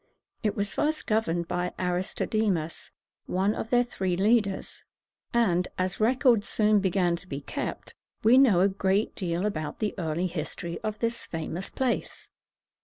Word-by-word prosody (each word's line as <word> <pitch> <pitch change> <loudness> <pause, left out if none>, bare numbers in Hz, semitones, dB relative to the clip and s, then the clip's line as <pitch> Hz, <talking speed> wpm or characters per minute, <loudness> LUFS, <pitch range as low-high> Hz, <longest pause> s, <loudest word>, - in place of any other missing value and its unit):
It 210 -3 0
was 200 0 -2
first 310 +1 0
governed 175 -7 0
by 180 0 -2
A 180 -1 0
ris 180 +1 -2
to - - -1
de´mus, 190 -8 -1 0.4
one 190 +3 +1
of 225 - -5
their 245 0 +4
three 190 -7 -2
leaders; 205 -1 +1 0.5
and, 180 -7 +2
as 185 0 -1
records 235 -1 +3
soon 215 -1 +4
began 185 -2 +1
to 185 - -10
be 140 -5 -4
kept, - - -5 0.3
we 235 +4 +7
know 220 -10 +5
a 195 - +5
great 195 +2 0
deal 175 0 -2
about 155 -7 -3
the 215 -2 -1
early 165 +1 -1
history 170 0 -3
of 215 -1 -3
this 230 +2 -2
famous 165 +3 -4
place. 260 -2 -2
195 Hz, 165 wpm, -27 LUFS, 175-220 Hz, 0.5 s, we